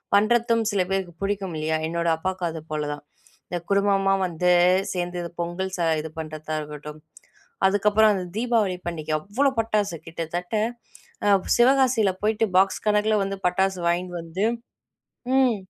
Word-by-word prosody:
பண்ணுறதும் 230 +2 +3
சில 200 -2 +1
பேருக்கு 190 -2 -2
பிடிக்கும் 195 -2 -2
இல்லையா. 155 +1 0
என்னோட 170 +1 -2
அப்பாவுக்கு 185 +2 -3
அது 160 -1 -6
போல 155 -1 -1
தான். 145 - -10 0.5
இந்த 175 - -2
குடும்பமா 200 -1 +3
வந்து 180 +1 +1 0.4
சேர்ந்து 175 -1 -3 0.2
பொங்கல் 175 +2 -3
ச - - -10 0.2
இது 160 - -7
பண்ணுறதா 155 0 -5
இருக்கட்டும் 150 0 -9 0.7
அதுக்கப்புறம் 210 +2 +4
அந்த 190 -2 -2
தீபாவளி 225 -5 +1
பண்டிகை 160 -2 -3
அவ்வளோ 225 - +1
பட்டாசு, 210 -5 0
கிட்டத்தட்ட 170 +4 -4 1.0
சிவகாசியில 250 -4 +4
போயிட்டு 220 +1 +2
பாக்ஸ் 195 +1 +2
கணக்கில 210 +1 +3
வந்து 195 0 -3
பட்டாசு 190 +1 0
வாங்கிட்டு 175 +1 -1
வந்து 165 +4 -4 0.9
ம். 255 -4 +4
190 Hz, 135 wpm, -24 LUFS, 170-210 Hz, 1.0 s, அதுக்கப்புறம்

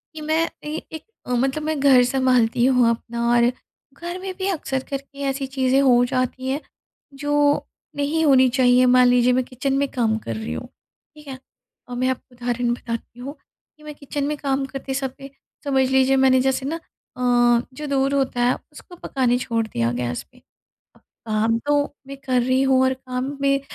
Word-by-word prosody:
कि 310 - -7
मैं 315 +2 +1
कहीं 305 +1 -7
एक 315 -1 -7 0.2
अ, 250 - -6
मतलब 270 +5 0
मैं 310 -2 -2
घर 265 -3 +6
सँभालती 250 -2 +2
हूँ 250 -3 +4
अपना 235 0 -2
और 240 0 +4 0.4
घर 345 +3 -6
में 380 0 -5
भी 380 - -2
अक्सर 270 -7 -2
करके 275 0 -7
ऐसी 270 0 -3
चीज़ें 265 0 +1
हो 245 -2 +5
जाती 255 0 -2
हैं 285 +3 -1 0.6
जो 290 - -1 0.6
नहीं 295 +3 0
होनी 260 -3 +6
चाहिए। 250 0 +4
मान 250 0 +5
लीजिए 245 0 +4
मैं 255 0 +2
किचन 260 +2 -3
में 280 0 +1
काम 225 -3 0
कर 115 - -5
रही 110 -8 -5
हूँ, 80 - -6 0.5
ठीक 300 -1 -15
है? 260 -1 -7 0.5
और 245 - -6
मैं 255 +1 0
आपको 255 -1 -5
उदाहरण 240 0 -1
बताती 235 0 -6
हूँ, 275 +4 -6 0.4
कि 300 - -20
मैं 300 0 -8
किचन 285 0 -5
में 300 - -1
काम 275 -1 -1
करते 270 0 -6
समय 270 0 -5 0.3
समझ 265 -2 +2
लीजिए 265 0 +3
मैंने 260 -1 +4
जैसे 265 0 0
ना 315 - -2 0.4
अ, - - -6 0.5
जो 300 +3 -6
दूध 275 0 +1
होता 265 -3 0
है 245 - +3 0.2
उसको 355 +4 -13
पकाने 255 -6 0
छोड़ 230 -2 -1
दिया 115 - -1
गैस 120 0 -3
पे। 250 - -23 0.6
अब - - -24 0.2
काम 225 +1 +1
तो 290 0 +3 0.2
मैं 275 0 -8
कर 255 -2 +2
रही 255 +2 +2
हूँ 265 -1 +3
और 260 0 +2
काम 260 +2 -5
में 275 0 +2
260 Hz, 190 wpm, -22 LUFS, 245-275 Hz, 0.6 s, घर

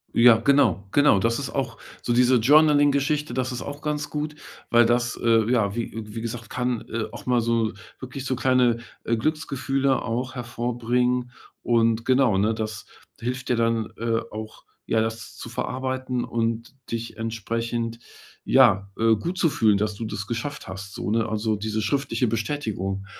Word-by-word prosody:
Ja, 115 -1 +7
genau, 125 -4 +3
genau. 145 -8 +5
Das 115 +5 +1
ist 135 - -4
auch 125 -5 -3 0.2
so - - -2
diese 125 +1 +4
Journaling-Geschichte, 145 +2 +4
das 130 +1 -1
ist 125 - -4
auch 145 +1 -7
ganz 150 -1 -2
gut, 150 +1 -3 0.3
weil 120 0 +6
das, 120 +1 +1
äh, 115 -1 +3
ja, 110 -5 +2
wie 120 -1 -2 0.2
wie 105 +2 -7
gesagt, 115 0 -6
kann, 125 -2 -1
äh, 115 -1 -2
auch - - -9
mal 125 -1 +3
so 115 -1 +1 0.3
wirklich 135 +1 -7
so 130 - 0
kleine, 125 -2 +3 0.3
äh, 115 - +2
Glücksgefühle 135 0 0
auch 125 +3 -3
hervorbringen 125 0 -1 0.3
und 115 -1 +2
genau, 130 -5 +3
ne, 105 +3 +2
das 110 -3 -5 0.3
hilft 125 +2 -3
dir 125 - +2
dann, 115 -1 0
äh, 115 0 0
auch, 110 0 -8 0.2
ja, 110 - +1
das 110 -1 -3
zu - - -8
verarbeiten 130 -1 -3
und 115 +2 -2 0.2
dich 115 0 -4
entsprechend, 115 +1 -3 0.4
ja, 100 +1 +4
äh, 115 0 +4
gut 175 - -4
zu 170 - +3
fühlen, 110 -7 +3
dass 105 +1 -1
du 115 - -6
das 105 -2 -4
geschafft 120 +6 -4
hast, 95 +1 -8
so, - - -4
ne, 115 +1 +1
also 110 0 0
diese 110 +1 -2
schriftliche 125 +1 0
Bestätigung 105 -4 -2
115 Hz, 170 wpm, -24 LUFS, 110-130 Hz, 0.4 s, Ja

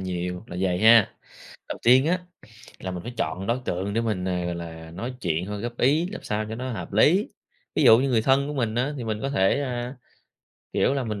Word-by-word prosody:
nhiều, 90 +1 -4
là 90 - -8
vầy 90 -2 +1
ha. 110 +1 +6 0.5
Đầu - - -5
tiên 130 +5 +6
á, 180 +2 +2 0.6
là 95 - -5
mình 90 -1 -6
phải 120 - -7
chọn 90 +5 -2
đối 120 +2 +1
tượng 95 +3 -2
để 115 - +1
mình, 105 -6 -2
ờ, 90 -1 -1
gọi 85 0 -2
là 80 -1 -8
nói 115 +9 -5
chuyện 85 -1 -1
thôi 105 +1 -5
góp 120 0 -5
ý, 150 +7 +3
làm - - -7
sao 105 0 -2
cho 110 - -4
nó 130 +2 -4
hợp 110 - -6
lý. 170 - +4 0.5
Ví - - +2
dụ 110 - +8
như 135 +3 +1
người 115 -3 +3
thân 135 +4 +3
của 150 - -4
mình 115 -6 -1
á, 130 +5 0
thì 125 - -5
mình 110 -2 -3
có 135 - -2
thể, 95 +3 +2
a, 125 -1 -4 0.8
kiểu 135 - +2
là 135 -3 -1
mình 105 -2 -4
110 Hz, 240 wpm, -25 LUFS, 90-130 Hz, 0.8 s, dụ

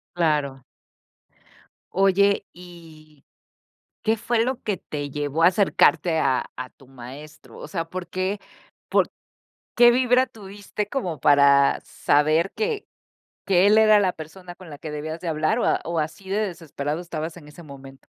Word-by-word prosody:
Claro. 145 -6 0 1.3
Oye, 195 +1 +3
y, 160 -4 -15 0.8
¿qué 225 0 +1
fue 230 +1 0
lo 260 0 -3
que 205 -3 -1
te 145 -2 -6
llevó 145 +3 -2
a 170 - +8
acercarte 180 -4 +2
a 135 -4 0
a 130 0 -6
tu 135 - -21
maestro? 135 +4 -12
O - - -9
sea, 165 -4 -3
¿por 180 -1 -6
qué? 185 +3 -2 0.5
¿Por - - +2 0.6
qué 240 0 +7
vibra 250 +1 +3
tuviste 205 0 -7
como 180 - -3
para 140 -1 +5
saber 155 +5 +1
que 440 -1 -3 0.6
que 190 0 +4
él 215 +1 +5
era 215 -1 +6
la 185 -3 +2
persona 175 +3 -11
con 180 -4 -13
la 145 - -9
que 155 -1 -7
debías 155 +2 -5
de 180 - -8
hablar 155 +8 0
o - - 0
a - - +2
o 170 0 -2
así 170 +5 -4
de 205 - 0
desesperado 160 -3 -5
estabas 165 -1 -6
en 150 -4 -13
ese 160 +4 -13
momento? 135 -2 -13
170 Hz, 160 wpm, -23 LUFS, 150-200 Hz, 1.3 s, a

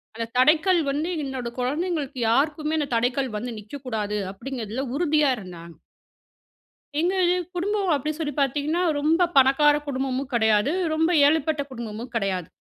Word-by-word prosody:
அந்த 230 - -3
தடைக்கல் 325 +6 +4
வந்து 305 +5 -2
என்னோட 265 -3 -4
குழந்தைங்களுக்கு 290 +1 -2
யாருக்குமே 300 +5 +1
அந்த 290 - -2
தடைக்கல் 250 +3 0
வந்து 240 +3 -5
நிக்கக்கூடாது 215 -3 -4
அப்டிங்கறதில 245 +2 -5
உறுதியா 300 -3 +2
இருந்தாங்க. 170 -4 -10 1.3
எங்க 360 +4 +1 0.2
இது 360 - +2 0.2
குடும்பம் 395 +1 -1
அப்டின்னு 300 +3 -2
சொல்லி 295 -3 -2
பார்த்தீங்கன்னா? 295 +6 0 0.2
ரொம்ப 320 +4 +2
பணக்கார 275 +3 +5
குடும்பமும் 270 0 -2
கடையாது, 220 +3 +3 0.2
ரொம்ப 320 +2 +2 0.2
ஏழைப்பட்ட 310 -1 +1
குடும்பமும் 235 0 -7
கெடையாது 190 -6 -1
275 Hz, 130 wpm, -24 LUFS, 235-310 Hz, 1.3 s, பணக்கார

